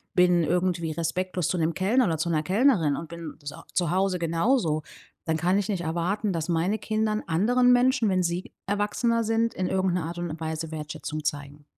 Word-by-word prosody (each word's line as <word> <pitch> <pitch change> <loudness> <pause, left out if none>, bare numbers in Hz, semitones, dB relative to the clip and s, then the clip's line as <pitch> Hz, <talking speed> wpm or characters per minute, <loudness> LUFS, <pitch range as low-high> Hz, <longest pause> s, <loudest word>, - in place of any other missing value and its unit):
bin 180 -1 +4
irgendwie 175 -1 0
respektlos 170 +2 -2
zu 180 - -1
'nem 160 +1 0
Kellner 230 +7 +2
oder 165 -5 0
zu 160 +2 -1
'ner 155 - +2
Kellnerin 185 - +3
und 165 - -7
bin 170 -2 -8
so 145 0 -7 0.2
zu 175 -4 +1
Hause 190 0 +1
genauso, 170 - +1 0.4
dann 160 -1 0
kann 180 +5 +2
ich 205 - -3
nicht 190 -4 -1
erwarten, 175 +5 -1
dass 165 +1 -3
meine 175 +6 +1
Kindern 215 0 -1
anderen 245 +9 +3
Menschen, 245 -3 +3
wenn 185 -1 +2
sie 175 +2 -3
erwachsener 210 +3 0
sind, 225 +1 +1
in 185 - -2
irgend 190 -1 +1
'ner 175 -3 -1
Art 170 +1 -6
und 170 -2 -4
Weise 160 0 -4
Wertschätzung 155 0 -5
zeigen. 145 0 -4
175 Hz, 195 wpm, -26 LUFS, 160-205 Hz, 0.4 s, bin